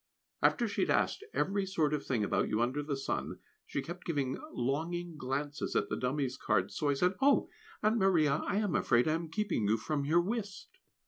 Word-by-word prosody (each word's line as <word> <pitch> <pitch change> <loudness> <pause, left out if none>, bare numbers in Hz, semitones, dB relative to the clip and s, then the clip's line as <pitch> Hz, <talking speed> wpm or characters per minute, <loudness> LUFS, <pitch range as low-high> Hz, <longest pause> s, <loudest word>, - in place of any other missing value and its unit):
After 235 - +3
she 205 - -2
had - - +1
asked - - +1
every 200 +1 0
sort 160 -6 +1
of 145 -2 -1
thing 120 -5 0
about - - +1
you 110 - 0
under 125 +5 +1
the 145 -1 -3
sun, 135 - -3 0.3
she 140 - -2
kept 175 +2 -7
giving 140 -6 -1 0.2
longing 165 +7 -2
glances 145 +2 -3
at 100 - +1
the - - -1
dummy's 130 +1 -1
cards; - - 0
so 150 - 0
I 140 - +2
said, 180 +6 +2
"Oh! 280 +1 +4 0.3
Aunt 215 +2 +3
Maria, 160 -7 +3
I - - 0
am 205 -4 +1
afraid 120 +1 +3
I 155 - +3
am 165 0 -3
keeping 175 - 0
you 110 +2 +3
from 145 +5 -2
your 160 +5 +3
whist." 210 - -5
155 Hz, 205 wpm, -32 LUFS, 135-185 Hz, 0.3 s, Oh